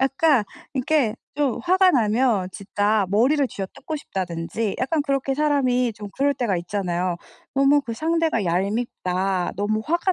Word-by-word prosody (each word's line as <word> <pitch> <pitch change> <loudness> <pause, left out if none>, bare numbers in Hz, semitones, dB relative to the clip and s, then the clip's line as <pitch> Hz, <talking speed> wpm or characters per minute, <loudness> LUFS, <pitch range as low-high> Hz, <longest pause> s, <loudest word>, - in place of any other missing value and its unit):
약간 270 -2 +3 0.3
이렇게 260 -4 +1 0.2
좀 285 -4 0
화가 370 +1 +4
나면 225 - +2
진짜 205 +1 0
머리를 255 +9 +3
쥐어뜯고 230 +10 -6
싶다든지 190 - -3
약간 295 +4 0
그렇게 275 -1 -1
사람이 260 -5 +2
좀 205 0 -8
그럴 280 +1 +2
때가 235 -8 0
있잖아요. 180 -1 -2 0.4
너무 275 +1 +4
그 240 -4 -6
상대가 320 -5 0
얄밉다 185 -1 -1
너무 210 +2 0
화가 345 +4 +1
240 Hz, 315 characters per minute, -23 LUFS, 200-285 Hz, 0.4 s, 화가